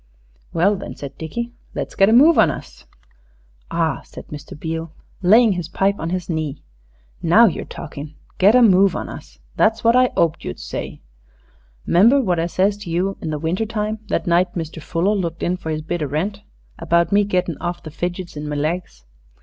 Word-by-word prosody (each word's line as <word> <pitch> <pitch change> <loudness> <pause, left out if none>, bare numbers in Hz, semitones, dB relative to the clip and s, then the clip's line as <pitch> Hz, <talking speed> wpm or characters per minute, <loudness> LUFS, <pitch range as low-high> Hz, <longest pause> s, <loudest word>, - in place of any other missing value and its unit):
"Well, 190 +5 +2
then," 190 - -7
said 140 -2 -8
Dickie, 235 +10 -4 0.2
"let's - - -4
get 195 +1 +4
a - - +3
move 295 +8 +6
on - - +6
us." - - -8 0.8
"Ah," - - 0
said - - -11
Mr. 150 0 -9
Beale, 160 0 -4 0.3
laying 220 +5 +6
his 180 -4 -3
pipe 195 +3 0
on 165 - -3
his 180 0 -3
knee, 155 -4 -3 0.6
"now 190 +8 +6
you're 190 - -1
talkin'. 150 -1 -8 0.2
Get 200 +5 +6
a 250 - +7
move 195 -2 +5
on - - -4
us. - - -11 0.2
That's 220 0 +2
what 230 +1 +4
I 255 0 +5
'oped 165 -1 +1
you'd 70 - -6
say. - - -6 0.8
'Member 225 +11 +5
what 185 -9 +1
I 165 - 0
says 195 +3 +1
to 205 -4 -9
you 180 +4 0
in 160 - -4
the 155 - -2
winter 170 +8 -1
time 215 0 -2
that - - -1
night 175 +1 +2
Mr. 160 -1 -5
Fuller 175 +7 0
looked 170 -5 -3
in 180 - +1
for 180 -3 -7
his 155 -1 -2
bit 170 +2 -3
o' 150 - -1
rent 190 +9 -2 0.4
about 170 +2 +2
me 205 +1 +4
gettin' 180 -5 -1
of 175 0 -4
the 155 - -8
fidgets 175 +2 -4
in 150 0 -5
my 150 - -3
legs? 150 - -3
175 Hz, 200 wpm, -20 LUFS, 160-205 Hz, 0.8 s, a